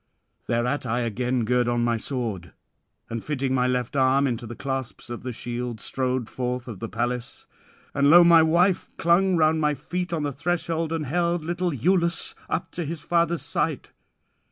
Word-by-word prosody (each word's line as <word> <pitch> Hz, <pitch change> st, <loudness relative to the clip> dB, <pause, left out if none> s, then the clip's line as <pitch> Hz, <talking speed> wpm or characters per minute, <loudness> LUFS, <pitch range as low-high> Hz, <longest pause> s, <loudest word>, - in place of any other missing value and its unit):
'Thereat 120 Hz, +4 st, 0 dB
I 120 Hz, 0 st, -1 dB
again 120 Hz, +1 st, -1 dB
gird 125 Hz, +1 st, +2 dB
on 120 Hz, 0 st, +1 dB
my 120 Hz, 0 st, +2 dB
sword, 110 Hz, -, -4 dB, 0.5 s
and 115 Hz, -1 st, -5 dB
fitting 135 Hz, -3 st, -1 dB
my 125 Hz, -1 st, +2 dB
left 125 Hz, +1 st, -1 dB
arm 135 Hz, +1 st, +3 dB
into 120 Hz, -3 st, -2 dB
the 120 Hz, -, -7 dB
clasps 135 Hz, -3 st, -5 dB
of 120 Hz, -, -5 dB
the 125 Hz, -, -4 dB
shield, 120 Hz, 0 st, -4 dB
strode 130 Hz, 0 st, -2 dB
forth 125 Hz, 0 st, -3 dB
of 110 Hz, -6 st, -7 dB
the 115 Hz, -, -5 dB
palace. 120 Hz, +1 st, -3 dB, 0.5 s
And 140 Hz, 0 st, +3 dB
lo! 175 Hz, +3 st, +9 dB
my 170 Hz, -1 st, +7 dB
wife 170 Hz, +4 st, +2 dB
clung 180 Hz, +3 st, +3 dB
round 155 Hz, 0 st, +3 dB
my 150 Hz, -1 st, +2 dB
feet 175 Hz, +5 st, -4 dB
on 160 Hz, -3 st, -1 dB
the 145 Hz, -1 st, -2 dB
threshold, 165 Hz, +1 st, -1 dB
and 160 Hz, -2 st, -2 dB
held 170 Hz, +3 st, 0 dB
little 175 Hz, +2 st, -1 dB
Iülus 170 Hz, -, +1 dB, 0.2 s
up -, -, -2 dB
to 175 Hz, -, -3 dB
his 160 Hz, 0 st, -5 dB
father's 170 Hz, -1 st, +1 dB
sight. -, -, -2 dB
135 Hz, 180 wpm, -25 LUFS, 120-165 Hz, 0.5 s, lo